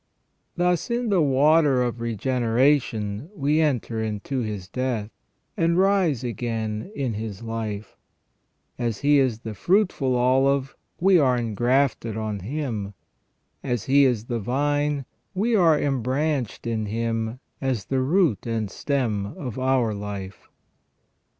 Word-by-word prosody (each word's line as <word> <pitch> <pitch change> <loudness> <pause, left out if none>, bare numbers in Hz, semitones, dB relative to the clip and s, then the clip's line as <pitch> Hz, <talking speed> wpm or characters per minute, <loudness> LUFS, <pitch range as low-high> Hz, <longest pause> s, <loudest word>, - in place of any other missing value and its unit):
Thus 175 +1 +1
in 235 0 0
the 190 -4 +3
water 145 -1 +4
of 120 -1 -2
regene 120 +2 -1
ration 120 -3 +1
we 150 +1 +2
enter 125 -7 0
into 110 +5 -3
His 105 -6 -4
death, 115 -1 -2 0.4
and 170 +1 +2
rise 185 - +2
again 115 - -3
in 130 -5 -1
His 105 0 -5
life: 110 -2 -5 0.8
as 115 -4 -2
He 145 0 +5
is 125 -5 +1
the 110 -2 -6
fruitful 155 - +1
olive, 135 +2 +2 0.2
we 185 0 +5
are 130 -4 +3
engrafted 120 0 0
on 110 -2 -3
Him: 110 -3 -4 0.7
as 120 -5 -2
He 140 +1 +4
is 120 -4 +1
the 120 -1 -2
vine, 145 +4 0 0.3
we 225 +5 +1
are 165 -6 +5
embranched 135 -1 -1
in 110 -2 -1
Him 115 +2 -2 0.2
as 130 -8 -1
the 130 +4 0
root 150 - +2
and 110 -3 -2
stem 115 -8 -1
of 125 -3 -5
our 130 -4 +2
life. 100 -1 -7
125 Hz, 130 wpm, -24 LUFS, 110-145 Hz, 0.8 s, He